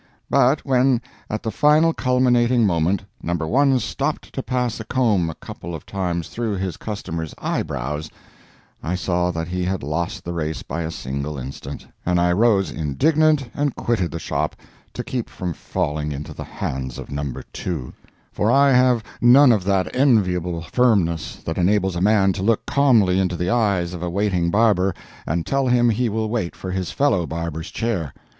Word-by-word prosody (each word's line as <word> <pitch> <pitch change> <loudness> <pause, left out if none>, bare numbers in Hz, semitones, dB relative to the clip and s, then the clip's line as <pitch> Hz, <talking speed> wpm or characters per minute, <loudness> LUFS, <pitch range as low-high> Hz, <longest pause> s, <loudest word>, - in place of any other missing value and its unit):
But 135 +2 +3
when, 130 -2 +3 0.3
at 110 +1 -3
the 110 - -2
final 150 +7 +4
culminating 125 -3 +3
moment, 90 +1 +1 0.2
No. 85 +1 -1
1 130 - +2
stopped 135 +6 -3
to 135 - -2
pass 125 -3 -1
a - - -4
comb 110 -8 +1
a 80 - -6
couple 85 0 -8
of 80 - -9
times 90 -4 -3
through 115 -3 -2
his 95 -3 -3
customer's 85 -7 -5
eye - - -1
brows, 75 +5 -4 0.7
I 85 +3 -2
saw 90 -1 0
that 85 -1 -3
he 90 0 -2
had 95 -2 -2
lost 80 +4 -3
the 85 - -4
race 80 -3 -3
by 85 +5 -4
a 80 - -3
single 70 -1 -4
instant, 70 +2 -7 0.2
and 90 0 +1
I 90 0 +3
rose 100 0 +3
indignant 140 - +2
and 145 -2 -1
quitted 110 -8 0
the 80 - -5
shop, 75 -2 -2 0.4
to - - -3
keep 125 -3 -4
from 90 -2 -4
falling 75 0 -2
into 75 +1 -6
the - - -7
hands 65 -2 -4
of - - -8
No. 70 -1 -3 0.2
2; 80 -9 -4 0.4
for 105 - 0
I 140 +1 +5
have 125 -3 +4 0.2
none 125 +3 +7
of 105 -5 +2
that 95 -2 0
enviable 90 - +2
firmness 90 -5 +1
that 80 +2 -2
enables 95 0 +2
a 85 - -2
man 100 -1 +4
to 95 - -5
look 110 +2 +1
calmly 115 -10 +3
into 90 -2 0
the 90 +3 -1
eyes 100 -7 +1
of 90 - -6
a 90 - -2
waiting 90 -2 0
barber 100 -2 +3 0.3
and 80 +1 -1
tell 135 -1 +1
him 120 -1 +4
he 120 +2 0
will 110 +1 -1
wait 110 -6 -2
for 95 - -6
his 95 -1 -2
fellow 100 - +1
barber's 80 -1 -4
chair. 95 - -2
95 Hz, 180 wpm, -22 LUFS, 85-120 Hz, 0.7 s, none